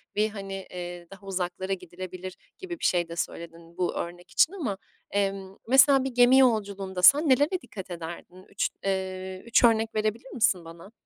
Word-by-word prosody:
bir, 210 +1 +2
hani, 195 -2 -7
eee, 175 -1 -7
daha 195 0 -13
uzaklara 190 0 -3
gidilebilir 185 0 -8 0.2
gibi 355 -4 -7
bir - - -3
şey 175 -2 +1
de 170 - -6
söyledin 170 0 -6
bu 180 -1 0
örnek 175 +1 -6
için 335 - +3
ama. 260 - -3 0.3
Emm, 195 -1 -2
mesela 265 +2 +6
bir 270 - -2
gemi 245 +1 +5
yolculuğunda 200 -6 +1
sen 285 - +7
nelere 290 +8 +3
dikkat 200 -7 -9
ederdin? 175 +2 -8
3, 200 - -1 0.2
eee, 190 -1 -3
3 235 +1 +3
örnek 225 -1 +3
verebilir 215 +4 -2
misin 195 -7 +1
bana? 170 +4 -12
195 Hz, 170 wpm, -27 LUFS, 180-230 Hz, 0.3 s, sen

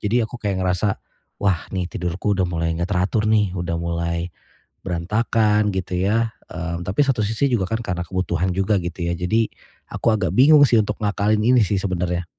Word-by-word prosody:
Jadi 115 +4 +1
aku 110 - -7
kayak 100 -3 -1
ngerasa, 90 +3 +1 0.5
"Wah, 95 -5 +1
nih 90 -2 -1
tidurku 90 +4 -2
udah 95 - +3
mulai 85 -1 -1
enggak 85 +4 -2
teratur 100 +4 +1
nih. 105 -3 +3
Udah 85 -1 -2
mulai 85 0 -2 0.5
berantakan." 105 +4 +1
Gitu 90 -1 -2
ya. 115 +1 +1 0.2
Mmm, 85 0 -4
tapi 95 - -1
satu 130 -5 +1
sisi 110 +6 0
juga 100 -6 +1
kan 115 0 -1
karena 90 -4 -2
kebutuhan 90 0 -1
juga, 95 +3 +1
gitu 85 0 -4
ya. 85 - 0
Jadi 110 +6 +1 0.4
aku - - 0
agak 95 -6 -1
bingung 145 +3 +7
sih 120 - +3
untuk 105 +1 -4
ngakalin 105 +1 +1
ini 125 +1 +4
sih 100 0 0
sebenernya. 90 -2 -2
95 Hz, 185 wpm, -21 LUFS, 90-110 Hz, 0.5 s, bingung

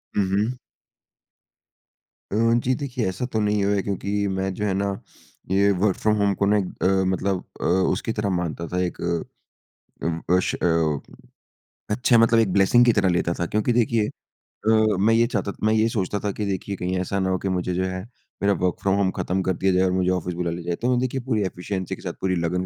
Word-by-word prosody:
हुँ, 100 - +3
हुँ। 110 +5 0 1.7
अ, - - -1 0.3
जी 130 - +3
देखिए, 125 -5 -3
ऐसा 95 +7 -3
तो 110 - +1
नहीं 105 -1 +1
है 100 -1 +2
क्योंकि 100 +1 -1
मैं 95 0 -2
जो 105 +3 -3
है 100 - 0
ना 100 +1 0 0.6
ये 100 +1 +4
वर्क 100 -3 +3
फ्रॉम 110 0 +2
होम 100 -1 +2
को 100 - +1
ना 105 +1 +3
एक 100 - 0 0.2
अ, - - +4 0.2
मतलब 95 0 -1 0.2
अ, - - -3
उसकी 95 +4 +1
तरह 100 - 0
मानता 85 -1 -3
था 90 - -2
एक 90 - -4
अ, 85 -1 -4 0.6
उम, 85 0 -1 0.2
अश 90 - 0
अ, 80 -4 +1 0.9
अच्छे 120 +3 +3
मतलब 115 0 +5
एक 105 -5 +1
ब्लेसिंग 100 +6 +5
की 120 - +5
तरह 95 - +2
लेता 85 -1 +1
था 85 - +1
क्योंकि 110 +5 0
देखिए 115 -2 +2 0.4
अ, 110 -2 +1
मैं 110 +3 +4
ये 115 +1 +4
चाहता 105 -4 -2
मैं 110 - +3
ये 110 +1 +3
सोचता 105 -2 -1
था 100 -1 -2
कि 105 +1 -3
देखिए 100 +1 -3
कहीं 90 +1 -2
ऐसा 100 +2 -2
ना 95 - 0
हो 95 - +1
कि 95 - -3
मुझे 90 -1 -1
जो 95 +1 0
है 95 0 -3 0.4
मेरा 100 0 +4
वर्क़ 90 -1 +1
फ्रॉम 95 0 +2
होम 100 -2 +2
ख़त्म 95 +1 -1
कर 95 - +1
दिया 95 -1 +3
जाए 90 +1 +3
और 95 - +2
मुझे 95 0 +1
ऑफ़िस 90 -1 -2
बुला 85 -1 -2
लिया 85 +1 -5
जाए। 85 0 -1
तो 125 - +2
मैं 125 - +2
देखिए 130 +1 -1
पूरी 120 -4 -1
एफ़िशिएंसी 95 0 -4
के - - -15
साथ - - -4
पूरी 95 -1 0
लगन 85 +2 0
100 Hz, 220 wpm, -23 LUFS, 90-105 Hz, 1.7 s, मतलब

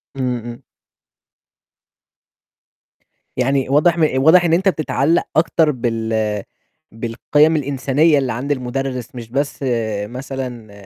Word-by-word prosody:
إمم، 125 -2 -1
إمم. 120 0 -9 2.7
يعني 135 +1 +1
واضح 160 +4 +3
م - - 0 0.2
واضح 175 +3 +6
إن 165 - +2
أنت 190 +3 +3
بتتعلّق 155 -1 +1
أكتر 160 -1 +3
بال 110 -4 -2 0.5
بالقيم 145 +7 +1
الإنسانية 145 +2 +2
اللي 135 -2 0
عند 135 +5 -4
المدرس، 130 -2 -3
مش 115 -2 -8
بس 140 +4 -2 0.5
مثلًا 125 -2 -7
135 Hz, 105 wpm, -19 LUFS, 120-150 Hz, 2.7 s, واضح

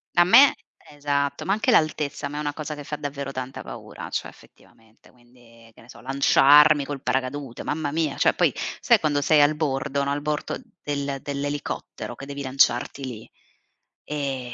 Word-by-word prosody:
A 175 - +6
me 255 +10 +7 0.4
esatto, 140 -1 -2
ma 195 - +1
anche 220 +5 +1
l'altezza 150 -6 +1
a - - -3
me 145 - -6
è - - -2
una 145 -1 -2
cosa 155 0 -6
che 145 - -9
fa 150 +1 -5
davvero 140 -1 -5
tanta 130 0 -6
paura, - - -9
cioè - - -3
effettivamente. 110 0 -20
Quindi 120 -2 -21
che - - -21
ne 115 - -18
so, - - -13
lanciarmi 140 +3 +5
col 140 -2 -6
paracadute, 130 -1 -3
mamma 150 -1 -2
mia, 155 -3 -1
cioè - - +3
poi - - +2 0.3
sai - - +4
quando 145 -1 0
sei 155 +1 +4
al 145 +1 +4
bordo 140 -2 -1
no 140 - -1
al 145 +1 -2
bordo 150 0 -3 0.3
del 140 -1 -3
dell'elicottero 145 +1 -5
che 135 - -9
devi 140 0 -7
lanciarti 135 0 +1
lì. 115 -4 -9 0.7
E 135 -4 -4
140 Hz, 180 wpm, -24 LUFS, 135-150 Hz, 0.7 s, me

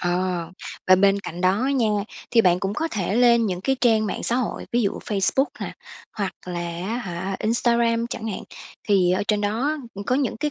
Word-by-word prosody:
Ờ. 175 -1 -1 0.4
Và 185 - +9
bên 200 +1 +4
cạnh 175 -2 -7
đó 185 +1 +4 0.2
nha, 235 -4 +2 0.4
thì 235 - +5
bạn 180 -3 +3
cũng 195 +1 -2
có 325 +5 -1
thể 195 - -1
lên 235 -2 +5
những 180 -2 -2
cái 270 +6 0
trang 220 -3 +3
mạng - - -3
xã 240 - 0
hội, 250 -4 -2
ví 240 0 +2
dụ 200 - +2
Facebook 210 +6 +1 0.2
nè, - - -4 0.5
hoặc 200 -2 -1
là 175 -1 -3 0.3
á 230 +3 -2
hả, 190 -3 -4
Instagram 235 +1 +2
chẳng 225 - -4
hạn. 200 - -4 0.5
Thì 185 -3 +4
ở 185 - +1
trên 210 -1 +2
đó 230 +9 0 0.3
có 250 - +2
những 265 -4 0
cái 300 +5 -1
210 Hz, 205 wpm, -23 LUFS, 185-235 Hz, 0.5 s, Và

